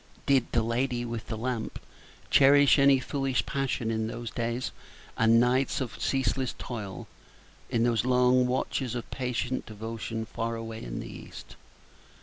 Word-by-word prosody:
Did 135 -3 +3
the 115 - +2
LADY 120 +1 -1
WITH 115 -1 -5
THE 110 - -4
LAMP 120 -1 -3 0.5
cherish 140 +1 +6
any 140 0 +6
foolish 135 0 -1
passion 135 -4 -1
in 110 0 -1
those 115 0 -5
days 120 +1 -2 0.4
and 115 0 +5
nights 125 +3 +2
of 115 -3 -5
ceaseless 130 0 0
toil, 100 -7 -6 0.6
in 115 - +1
those 120 -2 +2
long 125 0 +4
watches 125 -1 -1
of 120 - -4
patient 125 0 -2
devotion 110 +1 -5
far 115 +1 -3
away 115 -1 -6
in - - -5
the - - -7
East? - - -10
120 Hz, 145 wpm, -28 LUFS, 115-130 Hz, 0.6 s, cherish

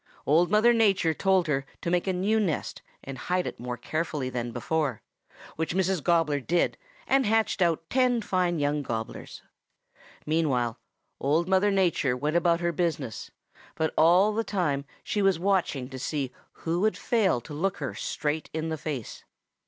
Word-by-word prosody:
Old 165 +4 +4
Mother 215 +4 +5
Nature 195 -7 +3
told 190 +1 +2
her 140 -3 0 0.2
to 170 - -2
make 180 +2 +1
a - - +2
new 200 +5 +1
nest 180 -8 -2 0.2
and 135 -2 -7
hide 180 +6 -1
it - - -6
more 125 0 -4
carefully 150 -1 -3
than 120 -1 -3
before, 150 -2 -2 0.5
which 160 +1 -2
Mrs. 190 -2 +1
Gobbler 165 -4 +2
did 170 +6 +1 0.3
and 270 -3 +2
hatched 220 -2 +1
out 165 -2 +1
ten 250 0 +2
fine 180 -3 0
young 145 0 0
Gobblers. 115 -4 -6 0.8
Meanwhile 135 -7 0 0.4
Old 155 +5 +1
Mother 190 +2 +3
Nature 175 -10 +1
went 150 +5 -1
about 170 0 +3
her 170 0 +1
business, 155 - -2 0.5
but 160 0 -1
all 180 +6 +5
the 225 +2 0
time 150 -10 -1 0.2
she 210 - -1
was 195 -3 +3
watching 175 -8 0
to 130 -1 -7
see 135 0 -3 0.2
who 170 +1 -2
would 215 +3 +1
fail 210 - +2
to 150 - -10
look 185 +6 -1
her - - -4
straight 155 +1 -3
in 160 0 -2
the 160 -1 -3
face. 145 -7 -5
165 Hz, 170 wpm, -27 LUFS, 145-190 Hz, 0.8 s, Mother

